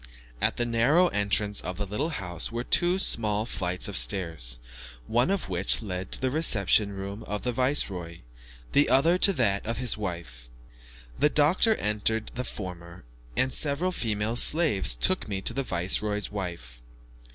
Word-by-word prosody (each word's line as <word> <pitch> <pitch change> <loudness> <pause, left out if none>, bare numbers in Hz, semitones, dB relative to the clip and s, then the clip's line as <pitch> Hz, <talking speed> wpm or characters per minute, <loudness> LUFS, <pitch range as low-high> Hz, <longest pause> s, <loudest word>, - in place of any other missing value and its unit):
At - - +1
the 120 - 0
narrow 130 +10 +3
entrance 105 0 0
of 90 - -6
the 105 - -3
little 105 - -3
house 90 - -5
were 120 +1 -3
two 175 +7 +2
small 110 - +1
flights 90 -4 -2
of - - -6
stairs, - - 0 0.5
one 120 - +1
of 195 -1 -1
which 95 +5 +2
led 95 -2 -5
to - - +1
the 130 -1 -1
reception 105 - +3
room 100 +2 -7
of 105 0 -4
the 125 - -1
viceroy, 100 - -1 0.5
the 145 - +4
other 165 +7 +3
to 200 - +6
that 105 - +1
of 115 -1 -3
his 125 -2 +1
wife. 85 - -7 0.7
The 150 - +4
doctor 165 +10 +4
entered 105 - -1
the 125 - -4
former 90 -6 -9 0.3
and 130 0 +1
several 155 +5 0
female 110 - -2
slaves 120 - +3
took - - -1
me 100 -2 -3
to - - -1
the 135 - -1
viceroy's 105 0 -1
wife. 85 -12 -7
105 Hz, 165 wpm, -26 LUFS, 90-130 Hz, 0.7 s, to